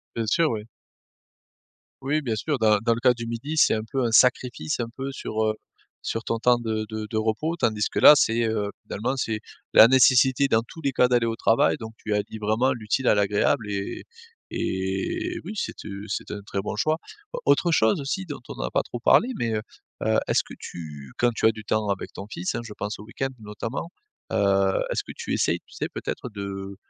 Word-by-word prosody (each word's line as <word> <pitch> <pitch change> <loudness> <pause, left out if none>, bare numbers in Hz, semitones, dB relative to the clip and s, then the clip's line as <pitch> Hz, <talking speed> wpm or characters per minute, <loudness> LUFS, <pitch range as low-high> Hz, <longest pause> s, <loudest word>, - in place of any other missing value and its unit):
Bien 115 -1 -1
sûr, 155 +8 +2
oui. 110 0 -4 1.3
Oui 150 +3 +1
bien 115 -4 -1
sûr, 145 +5 -1
dans 110 -1 +4
dans 115 +2 +1
le 115 - -5
cas 125 0 +5
du 115 -1 -6
midi, 120 +7 -4
c'est 155 - +5
un 110 - -2
peu 135 -2 0
un 115 - 0
sacrifice 125 -9 +3
un 120 -2 -2
peu, 135 +4 -6
sur, 110 -4 -3
heu, 110 - +1 0.5
sur 115 - -3
ton 115 - -2
temps 120 +1 +4
de 110 -2 -2
de 110 0 -5
de 110 - -3
repos, 110 +10 0
tandis 110 -6 +1
que - - -2
là, - - +10
c'est, 115 -4 +2
heu, 105 -2 -1
finalement, 120 +6 -2
c'est 110 -5 -2 0.3
la 110 - +9
nécessité 130 +1 +5
dans 115 -3 +2
tous 145 +7 -12
les 140 -3 0
cas 125 -1 +4
d'aller 120 -2 +2
au 115 - -1
travail. 115 0 +3
Donc 110 0 -8
tu 110 - -3
allies 105 +1 -2
vraiment 110 +5 +2
l'utile 120 +2 -1
à - - +5
l'agréable 105 +4 +1
et 100 -1 -4 0.5
et 95 +1 -2
oui 205 - -6
c'est, - - -3
heu, 100 0 -6
c'est 100 - -4
un 105 - -4
très 100 - -2
bon 105 - -4
choix. 155 +8 +1 0.3
Au - - -4
autre 170 -2 +3
chose 110 -2 +3
aussi 190 +8 -3
dont 145 -4 -6
on - - -8
a - - -2
pas - - +1
trop 120 - -7
parlé 230 - +4
mais, 115 -2 -1
heu, 105 - -2 0.4
heu, - - +2
est-ce - - +2
que - - -10
tu 75 -5 -9
quand 120 -1 +3
tu 110 - +1
as - - +7
du 110 -1 -8
temps 110 0 0
avec 100 -1 -3
ton 100 - -8
fils, 90 -4 -3
hein, - - -2
je 105 -2 -9
pense 105 +1 -5
au - - -9
week-end 135 +4 -3
notamment. 110 +9 -5 0.4
Heu, - - 0 0.6
est-ce - - -1
que - - -9
tu - - -4
essaies, - - +1
tu - - -22
sais - - -3
peut-être - - -5
de, 100 -1 -6
115 Hz, 225 wpm, -25 LUFS, 105-130 Hz, 1.3 s, là